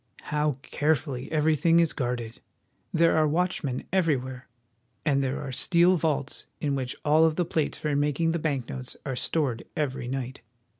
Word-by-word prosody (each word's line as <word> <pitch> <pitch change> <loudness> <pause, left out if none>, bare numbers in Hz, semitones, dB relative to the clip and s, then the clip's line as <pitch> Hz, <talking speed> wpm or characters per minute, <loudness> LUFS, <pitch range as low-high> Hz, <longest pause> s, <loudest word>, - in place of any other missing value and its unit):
How 150 0 +2
carefully 145 -4 -1
everything 160 +2 +3
is 165 -2 +2
guarded! 120 -3 -3 0.5
There 165 0 +4
are 155 -1 +4
watch 175 +4 0
men 130 -3 -2
everywhere, 135 -8 0 0.6
and 140 -2 +2
there 135 +2 -1
are 140 -2 -5
steel 175 +7 +4
vaults 150 -4 -1
in 145 -2 0
which 130 -2 -2
all 155 +2 +5
of 160 -1 +3
the 175 - +1
plates 160 -2 -1
for 150 -2 -1
making 150 +3 +1
the 170 - -1
bank 140 -6 -1
notes 125 -1 -6
are 135 -2 -2
stored 130 -3 0
every 135 -4 -2
night. 130 0 -4
150 Hz, 165 wpm, -27 LUFS, 130-160 Hz, 0.6 s, all